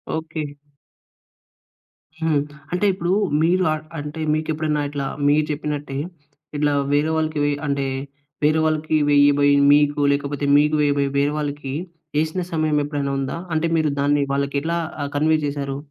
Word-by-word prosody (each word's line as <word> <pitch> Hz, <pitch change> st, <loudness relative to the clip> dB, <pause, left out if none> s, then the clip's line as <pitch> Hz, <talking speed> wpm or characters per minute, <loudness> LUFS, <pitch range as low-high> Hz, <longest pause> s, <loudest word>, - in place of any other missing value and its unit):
Okay. 160 Hz, -1 st, -4 dB, 1.8 s
హ్మ్. 155 Hz, -3 st, +2 dB, 0.3 s
అంటే 180 Hz, +3 st, +1 dB
ఇప్పుడు 175 Hz, -1 st, -2 dB, 0.3 s
మీరు 180 Hz, +3 st, +3 dB
ఆహ్, 155 Hz, -, -5 dB, 0.2 s
అంటే 150 Hz, +2 st, -6 dB
మీకు 155 Hz, 0 st, -1 dB
ఎప్పుడైనా 150 Hz, -1 st, -1 dB
ఇట్లా 140 Hz, -1 st, -3 dB, 0.2 s
మీరు 150 Hz, +1 st, +3 dB
చెప్పినట్టే, 145 Hz, -2 st, -4 dB, 0.6 s
ఇట్లా 145 Hz, 0 st, +2 dB, 0.2 s
వేరే 150 Hz, +2 st, +2 dB
వాళ్ళకి 155 Hz, -1 st, -1 dB
వెయ్ 145 Hz, 0 st, +1 dB
అంటే 140 Hz, -1 st, 0 dB, 0.6 s
వేరే 155 Hz, +1 st, +3 dB
వాళ్ళకి 155 Hz, 0 st, 0 dB
వేయబోయి 145 Hz, 0 st, +5 dB, 0.2 s
మీకు, 145 Hz, 0 st, +3 dB
లేకపోతే 140 Hz, 0 st, -1 dB
మీకు 150 Hz, +1 st, +3 dB
వేయబోయి 140 Hz, -1 st, +2 dB
వేరే 145 Hz, +1 st, +2 dB
వాళ్ళకి 145 Hz, -2 st, -4 dB, 0.4 s
యేసిన 160 Hz, +4 st, 0 dB
సమయం 155 Hz, -2 st, +1 dB
ఎప్పుడైనా 145 Hz, -1 st, -2 dB
ఉందా? 135 Hz, +4 st, -3 dB, 0.2 s
అంటే 160 Hz, +1 st, +1 dB
మీరు 155 Hz, -1 st, +2 dB
దాన్ని 145 Hz, 0 st, +2 dB
వాళ్ళకి 140 Hz, 0 st, -1 dB
ఎట్లా 170 Hz, +2 st, -1 dB, 0.3 s
ఆహ్, 140 Hz, -, -3 dB
కన్వే 155 Hz, +1 st, +3 dB
చేశారు? 140 Hz, -1 st, -3 dB
150 Hz, 145 wpm, -22 LUFS, 145-155 Hz, 1.8 s, వేయబోయి